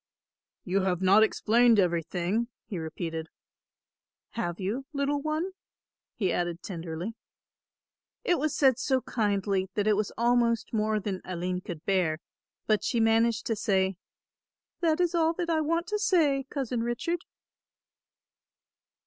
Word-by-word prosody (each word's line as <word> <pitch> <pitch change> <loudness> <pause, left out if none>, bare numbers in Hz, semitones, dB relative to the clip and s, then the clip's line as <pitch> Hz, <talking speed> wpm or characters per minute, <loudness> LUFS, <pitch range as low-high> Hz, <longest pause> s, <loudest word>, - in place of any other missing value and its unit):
"You 195 +2 +1
have 185 -2 0
not 195 +3 +6
explained 230 +1 +4
everything," 180 +4 0 0.2
he 190 - -5
repeated, 160 0 -5 1.0
"have 175 -7 -3
you, 225 +8 -3
little 285 0 0
one?" 310 +5 -1 0.6
he 190 -5 0
added 175 -1 -2
tenderly. 170 +3 -5 1.1
It 355 -8 +2
was 305 +1 0
said 265 -3 +4
so 260 -2 +1
kindly 200 -4 0
that 205 - +1
it 215 -1 +4
was 210 0 -1
almost 235 -1 +2
more 215 0 +1
than 195 -2 -4
Aline 180 0 -3
could 170 -3 -8
bear, 180 -5 +1 0.5
but 215 -2 +2
she 235 - 0
managed 225 0 +3
to 225 - 0
say, 190 -2 +1 0.8
"That 330 -1 +2
is 350 -1 +2
all 330 -1 +3
that 340 0 -2
I 320 -1 +2
want 335 +3 0
to 420 0 -1
say, 310 -10 +2
Cousin 255 -4 -2
Richard." 275 +9 -2
220 Hz, 135 wpm, -28 LUFS, 185-275 Hz, 1.1 s, not